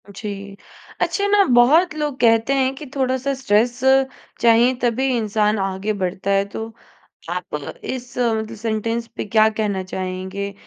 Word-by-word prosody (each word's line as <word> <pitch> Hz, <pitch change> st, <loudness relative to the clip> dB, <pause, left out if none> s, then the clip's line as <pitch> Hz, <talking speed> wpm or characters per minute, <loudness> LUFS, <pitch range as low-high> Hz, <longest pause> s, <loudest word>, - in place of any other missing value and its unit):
जी। 200 Hz, -2 st, -7 dB, 0.4 s
अच्छा 400 Hz, -, 0 dB
ना, 405 Hz, 0 st, +5 dB
बहुत 295 Hz, +7 st, +4 dB
लोग 295 Hz, -3 st, -3 dB
कहते 230 Hz, +2 st, +3 dB
हैं 265 Hz, -1 st, +1 dB
कि 300 Hz, -, -9 dB
थोड़ा-सा 260 Hz, 0 st, 0 dB
स्ट्रेस 240 Hz, +1 st, +2 dB, 0.6 s
चाहिए, 235 Hz, +2 st, +5 dB
तभी 245 Hz, +2 st, +1 dB
इंसान 215 Hz, -1 st, +1 dB
आगे 195 Hz, +2 st, -2 dB
बढ़ता 190 Hz, +2 st, -2 dB
है। 195 Hz, 0 st, +2 dB
तो 220 Hz, +2 st, -5 dB, 0.6 s
आप -, -, -4 dB, 0.3 s
इस 250 Hz, -, -6 dB
मतलब 225 Hz, -2 st, 0 dB
सेंटेंस 225 Hz, +1 st, -2 dB
पे -, -, -4 dB
क्या 215 Hz, +1 st, +4 dB
कहना 210 Hz, -3 st, -2 dB
चाहेंगे? 185 Hz, +2 st, -5 dB
225 Hz, 140 wpm, -21 LUFS, 200-255 Hz, 0.6 s, ना